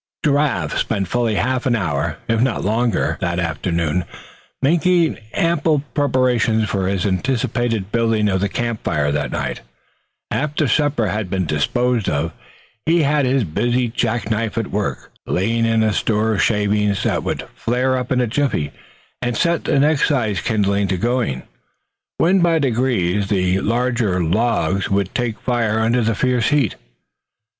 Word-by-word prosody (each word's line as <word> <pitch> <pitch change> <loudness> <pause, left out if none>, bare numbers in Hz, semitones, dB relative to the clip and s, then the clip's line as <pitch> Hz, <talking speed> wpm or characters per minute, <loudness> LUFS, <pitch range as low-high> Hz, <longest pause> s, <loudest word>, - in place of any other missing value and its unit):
Giraffe 145 -2 +1
spent 100 -4 -1
fully 120 -3 0
half 130 +4 0
an 120 - +2
hour, 75 -10 -1
if 115 -1 +1
not 130 -6 0
longer, 115 0 0
that 85 -2 -1
afternoon, 85 0 -1 0.6
making 170 +1 +2 0.2
ample 160 -3 +1
preparations 125 -6 +2
for 95 -2 -1
his 95 -2 -1
anticipated 115 0 -1
building 115 -2 +1
of 95 -2 0
the 100 - 0
camp 115 0 -3
fire 75 -2 0
that 70 -2 -1
night, - - -3 0.7
after 150 0 0
supper 135 -4 +1
had 105 -1 -3
been 95 -1 -1
disposed 115 +10 0
of. 75 +3 -1 0.6
He 165 0 +4
had 145 -1 +2
his 130 -1 +2
busy 120 +8 0
jack 115 -2 -1
knife 110 0 -1
at 115 -3 -2
work 105 0 -3 0.2
laying 115 +5 +1
in 115 -1 +2
a 110 -1 +1
store 110 +2 +1
of 95 - 0
shavings 105 -1 +1
that - - 0
would - - -3
flare 125 +3 0
up 125 0 -3
in 130 - +2
a 125 - +2
jiffy, 120 - -1 0.5
and 120 -2 -1
set 170 -1 +1
the 140 - +2
next 150 +1 +3
sized 110 - 0
kindling 100 -2 +1
to 95 - -1
going; 115 - -1 0.7
when 185 +3 +3
by 170 -2 +3
degrees 115 - 0
the 95 -2 +1
larger 120 -4 0
logs 100 +1 0
would 100 -1 0
take 120 -3 -2
fire 115 -3 0
under 115 +2 +2
the 115 -1 +1
fierce 125 0 +1
heat. 140 -8 +2
115 Hz, 155 wpm, -19 LUFS, 100-130 Hz, 0.7 s, He